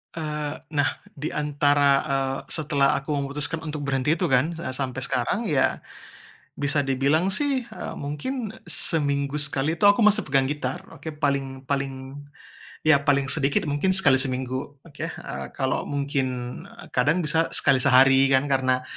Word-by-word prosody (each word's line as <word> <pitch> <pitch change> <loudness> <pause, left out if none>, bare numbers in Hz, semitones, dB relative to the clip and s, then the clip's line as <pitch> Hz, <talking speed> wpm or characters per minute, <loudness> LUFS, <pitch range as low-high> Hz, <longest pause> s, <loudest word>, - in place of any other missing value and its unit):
Eee, 150 -2 -4 0.2
nah, 145 -1 0 0.2
diantara, 145 -1 +1 0.2
eee, 135 -1 0
setelah 145 -3 +1
aku 145 +2 -3
memutuskan 145 +3 -1
untuk 155 -1 -5
berhenti 135 +1 +1
itu - - +1
kan, 135 +5 +2 0.2
sampe 130 -1 -3
sekarang 130 - -1
ya, 140 -7 +1 0.8
bisa 145 0 +1
dibilang 140 +6 +1
sih, 275 +3 +1
e - - -8
mungkin, 195 - -4 0.2
seminggu 145 -2 0
sekali 150 +2 +1
tuh 205 - +6
aku - - -1
masih 210 0 +4
pegang 135 -1 +3
gitar, 130 -1 -3
oke. - - -12
Paling 135 -2 -2
paling, 135 0 -4 0.6
ya 155 -2 +5
paling 140 -1 +1
sedikit 140 -1 +1
mungkin 155 +6 0
sekali 145 -9 +5
seminggu, 130 +1 -2
oke. 150 -4 -7
Eee, 70 0 -7
kalo 130 -1 -1
mungkin, 140 -1 -1 0.6
kadang 155 +8 +1
bisa 160 +2 +1
sekali 130 - +3
sehari 135 +1 +5
kan 135 0 +3
karena, 130 -1 +1
140 Hz, 140 wpm, -24 LUFS, 135-150 Hz, 0.8 s, tuh